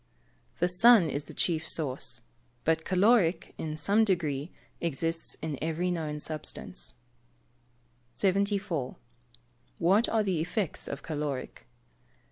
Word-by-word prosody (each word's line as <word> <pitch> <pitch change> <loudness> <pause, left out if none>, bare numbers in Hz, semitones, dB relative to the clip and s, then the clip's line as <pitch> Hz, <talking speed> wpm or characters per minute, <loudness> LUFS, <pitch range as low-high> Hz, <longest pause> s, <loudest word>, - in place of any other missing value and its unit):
_ - - -31
The 175 - +3
sun 180 -2 +6
is 145 +2 -4
its - - -10
chief 160 -2 -1
source. 130 -5 -2 0.4
But 160 0 +1
caloric, 190 -2 +3
in 155 -1 -3
some 205 +7 +3
degree, 160 -7 0 0.3
exists 165 +1 -2
in 155 -4 -3
every 165 +3 0
known 155 -3 -2
substance. 65 - -3 1.2
74. 195 -7 +1 0.8
_What 195 +7 +3
are 220 -1 +3
the 185 -6 0
effects 185 +1 -2
of 140 - -5
caloric? 145 -4 -4
165 Hz, 115 wpm, -29 LUFS, 150-190 Hz, 1.2 s, sun